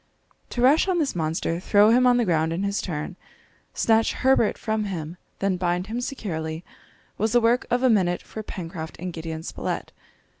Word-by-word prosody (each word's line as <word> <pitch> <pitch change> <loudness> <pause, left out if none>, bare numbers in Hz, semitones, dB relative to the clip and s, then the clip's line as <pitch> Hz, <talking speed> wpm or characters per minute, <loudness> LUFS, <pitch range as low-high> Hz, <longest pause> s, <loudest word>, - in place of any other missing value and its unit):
To 240 - -2
rush 290 +8 +5
on 370 -2 +1
this 300 - 0
monster, 165 +1 -1
throw 205 +3 +5
him 250 +2 +5
on 245 0 +5
the 240 - +2
ground 160 -3 +1
in 170 +4 -2
his 200 0 -1
turn, 165 +1 -5 0.6
snatch 225 0 +3
Herbert 260 -4 +2
from 220 -1 -1
him, 170 -3 -5 0.2
then 195 -2 0
bind 180 0 0
him 230 +4 -4
securely, 160 - -4 0.6
was 220 +2 +1
the 240 - +6
work 235 +2 +2
of 245 +2 +1
a 260 - +5
minute 180 -5 +1
for 220 - -7
Pencroft 165 -5 -7
and 180 0 -5
Gideon 160 -1 -5
Spilett. - - -4
195 Hz, 185 wpm, -24 LUFS, 165-235 Hz, 0.6 s, the